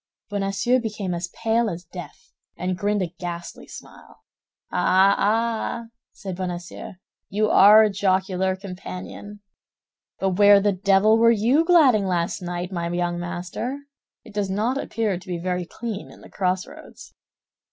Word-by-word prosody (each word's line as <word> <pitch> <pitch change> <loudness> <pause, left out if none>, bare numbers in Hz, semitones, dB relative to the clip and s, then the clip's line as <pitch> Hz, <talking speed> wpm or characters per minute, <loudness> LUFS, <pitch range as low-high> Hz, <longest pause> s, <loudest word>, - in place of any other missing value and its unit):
Bonacieux 200 +5 +1
became 210 -5 -4
as 175 +1 -3
pale 225 +3 0
as 175 -1 -6
death, 175 0 -11 0.3
and 180 0 -2
grinned 205 +1 0
a 170 -1 -6
ghastly 170 -2 -7
smile. - - -14 0.5
"Ah, 190 +2 +4
ah!" 225 +2 0 0.3
said 190 -3 -7
Bonacieux, 175 -1 -6 0.4
"you 210 +2 +1
are 210 +2 +8
a 215 - +3
jocular 190 -1 0
companion! 195 +2 -9 0.8
But 190 0 -1
where 205 0 +8
the 205 +1 +2
devil 200 +3 +3
were 230 0 +6
you 235 +8 +3
gadding 280 - +4
last 175 0 -1
night, 175 +1 -4
my 170 -2 -3
young 175 0 -1
master? 175 +9 -4 0.5
It 215 - -14
does 205 -2 -1
not 225 +8 0
appear 215 -9 -2
to 190 - -18
be 180 -1 -3
very 180 0 -3
clean 220 -1 -6
in - - -16
the - - -15
crossroads." 185 -1 -4
195 Hz, 145 wpm, -23 LUFS, 180-215 Hz, 0.8 s, are